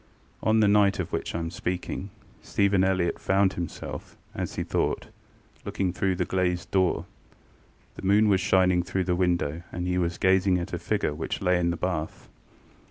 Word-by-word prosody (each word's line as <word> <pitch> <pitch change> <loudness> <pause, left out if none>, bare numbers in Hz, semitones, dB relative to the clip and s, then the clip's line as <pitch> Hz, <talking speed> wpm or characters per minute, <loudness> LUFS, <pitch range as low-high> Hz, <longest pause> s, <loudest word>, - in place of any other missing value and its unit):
On 110 0 +3
the 105 - +5
night 100 -1 +4
of 95 - -3
which - - -3
I - - +1
am 85 0 -3
speaking, 90 +2 -4 0.3
Stephen 100 -1 +2
Elliott 95 -2 +1
found 95 0 +2
himself, 85 -3 -6 0.2
as - - -4
he - - -1
thought, - - -1 0.5
looking 95 -3 -2
through 95 0 0
the - - -1
glazed 90 -2 -1
door. 95 -2 +2 0.9
The - - -7
moon 105 +2 +5
was 100 -2 +3
shining 90 -2 +3
through 95 +2 -2
the 90 0 0
window, 85 -3 0
and 90 +1 -4
he 90 0 0
was 85 -1 -1
gazing 95 0 +3
at 85 - -5
a - - -2
figure 75 - -1
which 80 +2 -4
lay 90 -2 +2
in 85 -1 +1
the 85 - -1
bath. 80 -2 -3
90 Hz, 180 wpm, -26 LUFS, 85-95 Hz, 0.9 s, the